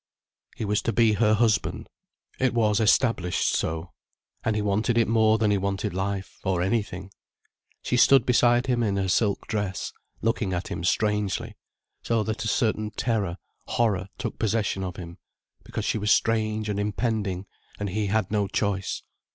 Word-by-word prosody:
He - - -3
was 105 0 +1
to 115 - -1
be 115 0 +4
her 105 0 +3
husband. 110 -1 +1 0.5
It 130 -2 +1
was 105 -3 +3
established 110 - +2
so. 80 +2 -2 0.5
And 110 - 0
he 105 - 0
wanted 105 +3 +1
it 115 - +3
more 110 -1 +4
than 105 -1 +2
he 100 - +2
wanted 100 +1 -2
life, 95 +1 -3
or 95 -3 0
anything. 95 -2 -2 0.7
She 125 - 0
stood 135 -1 +6
beside 120 0 +4
him 125 -2 +1
in 100 -4 0
her 95 -1 0
silk 100 +2 +1
dress, 100 -5 -3 0.3
looking 110 -4 0
at 90 0 -3
him 80 - -4
strangely, 105 +3 0 0.5
so 115 -2 0
that 110 +1 -3
a - - -2
certain 110 -3 0
terror, 105 -5 -1 0.3
horror 100 -5 +1
took - - -5
possession 105 -3 0
of 90 -1 -4
him, 85 -1 -9 0.4
because - - -5
she - - 0
was 105 +1 +1
strange 110 -1 +1
and 105 -1 -2
impending 105 -3 -1 0.3
and 105 -1 -2
he 105 +1 -1
had 105 -1 0
no 105 -2 +1
choice. 100 -1 -2
105 Hz, 170 wpm, -26 LUFS, 95-115 Hz, 0.7 s, stood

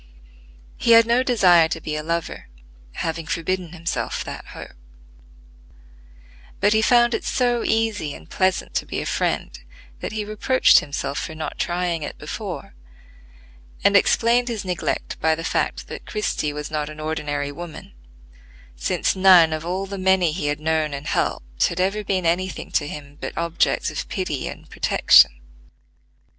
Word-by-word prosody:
He 235 - +4
had 230 0 +8
no 235 +2 +3
desire 185 -10 +5
to 165 - -4
be 155 -1 -4
a 155 - -2
lover, 165 +2 -4 0.5
having 165 -1 -4
forbidden 180 +1 -2
himself 170 -1 -3
that - - -8
hope; - - -10 1.9
but 205 +1 +3
he 220 - +3
found 240 +1 +4
it - - -2
so 245 -2 0
easy 220 -9 0
and 80 - -13
pleasant 185 0 0
to - - -2
be - - -3
a - - -4
friend - - -2 0.4
that - - -5
he 215 -1 -3
reproached 215 +5 +4
himself 140 -1 -4
for 160 - -6
not 155 0 -6
trying 175 -1 -1
it 145 - -6
before; - - -6 1.1
and - - +4
explained 240 +2 +3
his 225 -5 -4
neglect 180 -2 -3
by 160 0 +2
the 165 - -7
fact - - -1
that - - -9
Christie 210 -8 -2
was 150 0 -6
not 150 -1 -2
an 155 0 -10
ordinary 150 -2 -3
woman, 170 - -9 0.8
since 60 - 0
none 185 -4 +6
of 155 0 -4
all 185 +2 -2
the 195 0 -6
many 185 -3 +3
he 155 -2 -3
had 145 +1 -1
known 155 -2 0
and 140 +2 -8
helped, 60 - 0
had 170 - -5
ever 195 +3 0
been 190 -3 -1
any 180 +3 +1
thing - - -8
to 145 - 0
him 145 -1 -9
but - - -6
objects 170 0 0
of - - -5
pity - - -3
and - - -9
protection. - - +5
170 Hz, 165 wpm, -22 LUFS, 155-200 Hz, 1.9 s, had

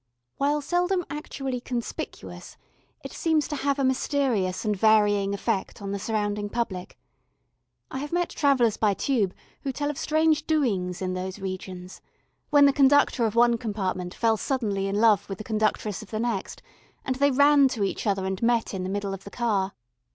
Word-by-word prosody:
While 290 +2 +1
seldom 355 +3 0
actually 270 -4 -4
conspicuous, 240 -2 -6 0.5
it - - -7
seems 320 -2 +1
to 300 - -2
have 280 0 0
a 275 - 0
mysterious 260 -8 0
and 210 -1 +1
varying 205 -1 +3
effect 200 -1 -2
on 200 -1 -5
the 200 - -3
surrounding 205 -1 -2
public. 200 -6 -4 0.9
I 265 - -4
have 290 +1 -5
met 350 0 0
travellers 260 -7 +2
by 205 -2 +2
Tube 215 -8 0 0.3
who 275 - -2
tell 290 +3 -2
of 290 - -8
strange 310 0 +2
doings 195 - 0
in 185 0 -2
those 185 +1 -4
regions, 185 -1 -7 0.5
when 290 -1 +6
the 280 - +5
conductor 270 -4 +4
of 215 - -5
one 235 0 +4
compartment 190 -5 -3
fell 225 -1 +2
suddenly 205 -7 -1
in 195 - -2
love 210 -2 +3
with 195 - -4
the 215 - -7
conductress 215 -2 -1
of 215 - -12
the 215 - -3
next, 225 -5 -3 0.4
and 260 -1 -1
they 280 +1 +4
ran 285 +1 +5
to 230 -5 -2
each 195 - -2
other 195 -2 0
and 190 0 -3
met 235 -2 +1
in 190 - -3
the 185 - -3
middle 200 0 -2
of 195 0 -7
the - - -9
car. 200 -4 -1
225 Hz, 180 wpm, -26 LUFS, 195-275 Hz, 0.9 s, when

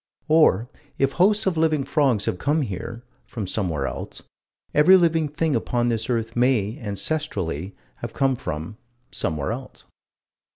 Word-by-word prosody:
Or 150 -9 +4 0.3
if 135 0 +2
hosts 205 +6 +3
of 185 -4 +1
living 155 -3 +2
frogs 135 -7 +1
have 90 - -2
come 150 +2 +1
here 115 +2 -6 0.2
from 110 -4 -5
somewhere 90 -8 -2
else - - -6 0.5
every 180 +6 +7
living 165 -3 +2
thing 155 0 -1
upon 120 +1 0
this 115 0 -2
earth 115 -1 -1
may, 120 -4 +2
ancestrally, 100 - -2 0.2
have - - -6
come 135 -1 +1
from 80 -1 -5 0.3
somewhere 75 -3 -2
else. - - -8
120 Hz, 140 wpm, -23 LUFS, 100-155 Hz, 0.5 s, every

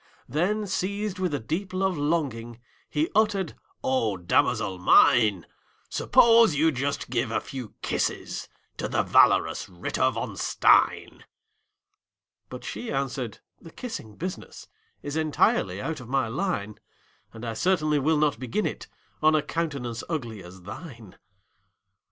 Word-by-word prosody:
Then, 200 +8 0
seized 200 +1 -2
with 185 -3 0
a 145 - -1
deep 170 - -3
love 190 0 0
longing, 140 -7 -2 0.3
He 155 +2 0
uttered, 205 -5 +1 0.3
"O 115 -7 +1
damosel 90 +1 +1
mine, 100 0 +5 0.4
Suppose 230 -7 +5
you 160 +2 +3
just 140 -2 -3
give 120 -1 0
a 110 - 0
few 125 -6 -8
kisses - - -2 0.3
To - - -2
the - - +1
valorous - - +3
Ritter 90 -2 0
von - - -4
Stein!" - - +2 1.3
But - - -8
she - - -5
answered, 135 -4 -3 0.2
"The 165 - -11
kissing 160 - -7
business 180 - -7 0.4
Is 145 +1 -4
entirely 145 -11 +1
out 155 +6 -3
of 120 -2 -11
my 135 -3 +1
line; 115 - -3 0.5
And 115 +1 -9
I 115 - -3
certainly 155 +2 +1
will 155 +3 +2
not 150 -6 +1
begin 130 - -2
it - - -4 0.3
On 155 0 +5
a 150 - +2
countenance 140 -8 -3
ugly 120 - -4
as 90 +1 -13
thine!" 110 - -10
145 Hz, 135 wpm, -26 LUFS, 115-170 Hz, 1.3 s, mine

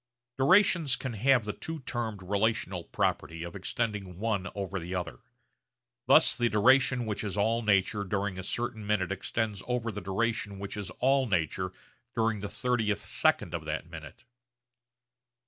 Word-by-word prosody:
Durations 170 -3 +5
can 130 -2 -5
have 120 +1 +3
the 105 - -3
two 160 -2 -6
termed 115 -6 -4
relational 100 -2 0
property 85 0 -1
of 85 0 -7
extending 100 -2 -3
one 105 -2 -1
over 100 -1 -3
the 90 +2 -5
other. 85 -9 -4 0.9
Thus - - +6
the 120 -1 +1
duration 125 +3 +4
which 105 -1 -3
is 105 -1 -4
all 115 +3 +2
nature 100 -1 +2
during 100 -1 -2
a - - -5
certain 115 0 -3
minute 95 -3 +1
extends 105 +1 -2
over 120 -2 -1
the 105 0 -6
duration 100 +2 -1
which 100 0 -6
is 105 -3 -5
all 135 +1 +3
nature 90 -1 0 0.4
during 115 -2 +1
the 100 - -4
30th 110 -4 -1
second - - +2
of - - -4
that - - -3
minute. - - -10
105 Hz, 155 wpm, -29 LUFS, 95-120 Hz, 0.9 s, Thus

